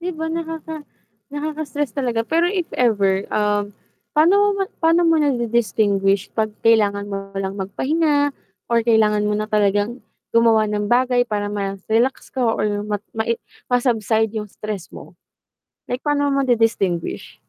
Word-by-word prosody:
'Di 355 +1 -3
ba 320 +1 -4
nakaka 325 -1 -5 0.5
nakaka-stress 295 -1 -4
talaga, 240 -4 0
pero 335 +1 +2
if 360 -1 -1
ever, 200 -5 +2
um, 205 -1 0 0.4
pa'no 395 +7 +4
ma 395 -1 -1 0.2
pa'no 330 +1 +4
mo 330 - +4
nadi-distinguish 220 -7 +1
pag 215 -1 0
kailangan 205 -3 +2
mo 195 0 -6
lang 195 0 -3
magpahinga 290 - +1 0.4
or 230 -1 +2
kailangan 215 -2 +3
mo 210 - 0
na 215 +1 -3
talagang 205 +3 +1 0.3
gumawa 230 -1 +4
ng 210 0 -2
bagay 245 +1 +3
para 205 -1 -2
ma-relax 205 +5 -1
ka 260 - -3
or 210 -2 0
ma 210 -1 -1 0.2
mae 225 +1 0 0.3
ma-subside 225 -3 +1
yung 210 -1 -4
stress 210 -3 -6
mo. - - -12 0.7
Like 250 +2 -4
pa'no 285 -1 +1
mo 275 - +2
madi-distinguish? 225 -8 0
225 Hz, 140 wpm, -21 LUFS, 205-285 Hz, 0.7 s, pa'no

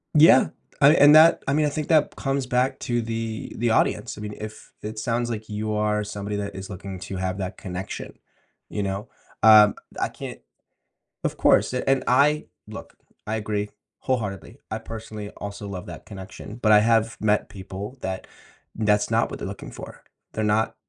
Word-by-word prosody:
Yeah, 150 -4 +7 0.3
I 145 +2 +8
and 145 -1 +7
that 160 +2 +7
I 135 - +2
mean, 150 +1 +3
I - - +2
think 150 +1 -4
that 155 -3 +3
comes 135 -1 -1
back 125 +1 0
to 120 -1 0
the 115 -1 -4
the 120 +1 +1
audience, 110 - +1
I - - -8
mean, 105 0 -6
if 110 0 -9
it 110 +1 -5
sounds 120 +1 -1
like 110 -2 -4
you 105 +1 -2
are 105 0 +1
somebody 105 0 -5
that 100 -1 -4
is 95 0 -7
looking 95 -1 -7
to 95 +3 -6
have 95 0 -2
that 95 0 -4
connection, 95 0 -6 0.5
you 105 - -2
know? 100 +3 -3 0.3
Um, 105 -2 +8 0.2
I - - 0
can't - - -8 0.8
of - - -2
course, - - +4
a 125 - -2
and 135 -1 +3
I 145 +4 +4 0.2
look, - - -10 0.3
I 110 - -1
agree 105 -1 -2 0.3
wholeheartedly. 105 -9 -3
I 110 - -2
personally 110 -2 -7
also 100 0 -7
love 95 -2 -6
that 85 -2 -9
connection, 100 +1 -9
but 110 - +4
I 105 - +8
have 115 +1 +2
met 105 -1 +2
people 95 +5 -8
that 95 0 -4 0.5
that's 105 -1 +1
not - - +2
what - - -7
they're - - -4
looking - - -8
for. - - -10 0.3
They're 110 - -2
not 110 +1 +1
110 Hz, 185 wpm, -24 LUFS, 100-120 Hz, 0.8 s, I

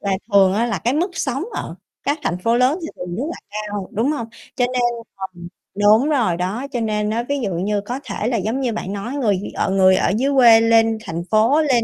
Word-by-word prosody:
là 195 -1 0 0.2
thường 195 -2 +5
á 230 +3 +1
là 235 - -2
cái 245 +3 0
mức 345 +6 0
sống 270 +1 -2
ở - - -5 0.3
các 290 +2 0
thành 175 - -1
phố 230 +6 +1
lớn 255 +6 +2
thì - - -3
thường 180 -1 -6
rất 235 - -2
là - - -7
cao, 205 -2 -5
đúng 230 +5 0
hông? 235 -7 -4 0.3
Cho 250 - +2
nên 250 0 -1 0.4
ờm, 185 -3 -8 0.3
đúng 215 +7 +4
rồi 230 - +1
đó, 200 +10 -3
cho 245 - -2
nên 210 -1 -1
á 230 +2 -1
ví 285 0 0
dụ 205 -7 -2
như 200 +4 -1
có 245 +6 -5
thể 215 - -3
là 240 -1 0
giống 220 +7 -2
như 245 -3 -1
bạn 200 -3 -4
nói 205 +6 -5
người 230 -9 +1
thì - - -6
ở - - -1
người 190 -1 +4
ở - - +1
dưới 270 +4 +1
quê 235 -4 +7
lên 225 0 +3
thành 170 -3 -4
phố, 225 +8 +4
lên 255 -7 +2
225 Hz, 250 wpm, -20 LUFS, 200-255 Hz, 0.4 s, quê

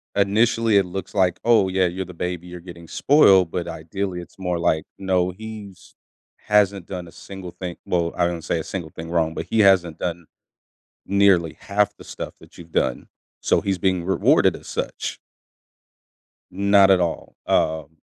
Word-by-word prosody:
initially 110 +2 +3
it 100 - +3
looks 95 +1 -6
like, 90 -3 +1
"Oh, 115 -5 +4
yeah, 95 0 +2
you're 95 +2 -4
the 90 - -11
baby, 90 0 -4
you're 90 0 -9
getting 85 -1 -12
spoiled," 95 - +4
but 90 - -3
ideally 90 +3 -4
it's 85 - -16
more 90 -2 -2
like, 80 -2 +1
"No, 90 -2 0
he's 105 -1 -11 0.5
hasn't 100 -3 +2
done 90 -2 -6
a - - -13
single 95 -1 -9
thing" 90 -1 -7
Well, 85 -1 0
I 90 - +3
wouldn't 85 -2 -3
say 85 - 0
a - - -4
single 85 -4 -6
thing 80 +2 -8
wrong, 80 -1 0
but - - -5
"He 110 - +1
hasn't 90 -5 +3
done 85 -1 -4 0.8
nearly 95 -5 +3
half 105 0 0
the - - -13
stuff - - -7
that - - -18
you've 85 -1 -13
done, - - -1 0.3
so - - +2
he's 95 -1 -1
being 95 -1 +1
rewarded 95 - +3
as - - -12
such." - - -4 1.3
Not 100 0 +4
at 95 -1 +5
all, 85 -2 -3
um 80 0 0
90 Hz, 175 wpm, -22 LUFS, 85-100 Hz, 1.3 s, at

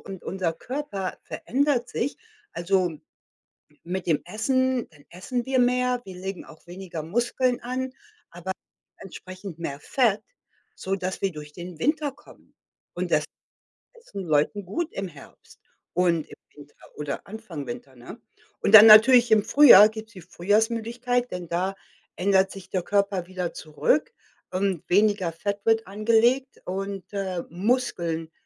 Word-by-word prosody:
und 195 -2 -9
unser 185 -3 -2
Körper 250 - -5
verändert 265 -1 -1
sich. 275 +5 -2 0.4
Also, 185 +2 +1
m 160 -4 -7 0.8
mit 180 +1 -4
dem 160 -4 +2
Essen, 260 +5 0
dann 145 -2 -20
essen 240 +8 -4
wir 265 -1 +1
mehr, 250 0 +2
wir 190 - -10
legen 190 0 -6
auch 160 +1 -17
weniger 175 -3 -7
Muskeln 240 - 0
an, 255 +1 -3 0.4
aber 175 +2 -5 0.5
entsprechend 185 -1 -10
mehr 145 -4 -5
Fett, 215 - +1 0.5
sodass 190 -1 -4
wir 195 -2 0
durch 150 -1 -10
den 175 -2 -9
Winter 300 - 0
kommen. 270 - -20 0.4
Und - - -3
das - - +3 0.7
essen 460 - -9
Leuten 160 +6 +1
gut 320 - -3
im 195 -1 -4
Herbst - - -16 0.3
und 170 -3 +1
im - - -13 0.2
Winter 145 0 -15 0.2
oder 150 +3 -5
Anfang 195 - -8
Winter, 130 +2 -8
ne? 120 - -11 0.4
Und 210 - 0
dann 220 +1 +11
natürlich 235 +3 +8
im 215 -2 +5
Frühjahr 240 -8 +9
gibt's 220 +1 -10
die 185 - -11
Frühjahrsmüdigkeit, 230 +7 0
denn 180 -1 -5
da 185 +4 -1 0.4
ändert 190 0 +2
sich 195 -2 -11
der 185 - 0
Körper 200 -2 0
wieder 180 -2 -4
zurück 160 - 0 0.4
und 185 -3 -2
weniger 200 -2 +2
Fett 200 +4 -3
wird 225 0 +2
angelegt 230 +6 +1
und, 195 0 -4
äh, 190 -3 -3
Muskeln 170 -5 -1
195 Hz, 145 wpm, -25 LUFS, 175-240 Hz, 0.8 s, dann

